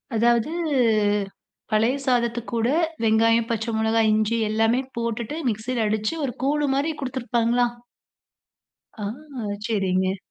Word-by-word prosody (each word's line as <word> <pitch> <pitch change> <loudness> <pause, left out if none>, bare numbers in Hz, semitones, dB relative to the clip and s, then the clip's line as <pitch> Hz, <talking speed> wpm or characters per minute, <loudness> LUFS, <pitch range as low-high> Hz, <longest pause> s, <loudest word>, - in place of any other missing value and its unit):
அதாவது, 235 +4 +2 1.2
பழைய 220 +4 +3
சாதத்துக்கூட, 235 -2 0 0.4
வெங்காயம், 230 +1 +3
பச்ச 225 -1 -1
மொளகா, 220 +1 +2
இஞ்சி 215 +2 +1
எல்லாமே 225 +4 +2 0.2
போட்டுட்டு 235 +5 -3
மிக்ஸில 225 +2 -2
அடிச்சு, 215 +6 -1
ஒரு 245 - -3
கூழு 290 +1 +1
மாரி 295 +4 0
குடுத்துருப்பாங்களா? 245 -2 +1 1.4
ஆ! - - -2 0.6
செரிங்க. 190 -3 0
230 Hz, 100 wpm, -24 LUFS, 220-245 Hz, 1.4 s, பழைய